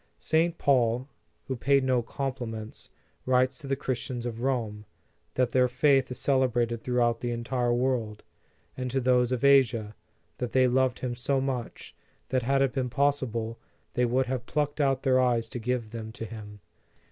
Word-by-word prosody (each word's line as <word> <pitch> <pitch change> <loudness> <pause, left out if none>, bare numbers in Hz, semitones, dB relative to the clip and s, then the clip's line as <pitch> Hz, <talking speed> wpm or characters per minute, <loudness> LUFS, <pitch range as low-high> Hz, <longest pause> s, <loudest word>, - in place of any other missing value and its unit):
St. 165 +1 +1
Paul, 125 -2 +2 0.4
who 130 - -3
paid 140 +2 +2
no 130 -2 +2
compliments, 120 -3 -5 0.4
writes 130 +1 +3
to 140 - -8
the 135 - +1
Christians 125 -2 -3
of 115 -1 -4
Rome, 115 -5 -2 0.5
that 125 -2 +1
their 125 0 +4
faith 135 +1 +3
is 125 - -5
cel 135 -2 +2
ebrated 120 -3 0
throughout 120 -2 +1
the 120 - -2
entire 120 +1 -1
world; 120 -4 -1 0.5
and 125 -1 -3
to 135 +2 0
those 125 -1 +2
of 125 +1 0
Asia, 120 -6 +4 0.5
that 125 - -3
they 130 -1 +5
loved 130 0 +1
him 125 -1 -2
so 135 +3 0
much, 130 -3 -4 0.3
that 130 0 +1
had 135 +3 +2
it 135 - 0
been 130 -2 -1
possible, 120 -4 0 0.3
they 125 - +2
would 130 +2 +1
have 125 -1 -4
plucked 150 0 -1
out 135 -2 +1
their 130 -2 +4
eyes 120 -3 +2
to 120 - -5
give 120 -1 -2
them 110 -1 -6
to 115 - -6
him. 105 -2 -10
125 Hz, 175 wpm, -28 LUFS, 120-130 Hz, 0.5 s, they